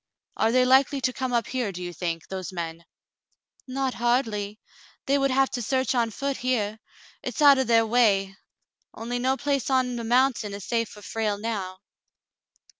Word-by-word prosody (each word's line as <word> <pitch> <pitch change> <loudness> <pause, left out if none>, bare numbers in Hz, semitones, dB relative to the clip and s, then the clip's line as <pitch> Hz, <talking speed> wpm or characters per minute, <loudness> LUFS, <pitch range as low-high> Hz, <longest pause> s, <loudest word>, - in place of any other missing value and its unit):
"Are 225 - +2
they 250 +1 +4
likely 265 +2 +4
to 255 0 0
come 260 0 -3
up 235 -2 +1
here, 250 -5 -2
do 180 -1 -7
you 175 0 -5
think, 165 -1 -4
those 190 -1 -5
men 165 -2 -5
P" 170 - -24 0.9
Not 265 -1 -1
hardly. 225 -4 -1 0.5
They 280 +1 +2
would 275 0 +2
have 270 +1 +2
to 245 - -3
search 260 +3 0
on 235 -2 +1
foot 275 +5 -3
here. 220 -4 -1 0.4
It's - - -5
out 285 -2 +7
of 265 - 0
their 230 -1 +4
way; 205 -4 +2 0.6
only 240 +2 -4
no 260 +2 +1
place 280 -2 -1
on 255 -2 +1
the 235 - -4
mountain 240 -3 +1
is 200 - -8
safe 230 -2 -1
for 210 0 -13
Frale 210 +1 -2
now." 200 -4 -4
235 Hz, 185 wpm, -25 LUFS, 205-260 Hz, 0.9 s, out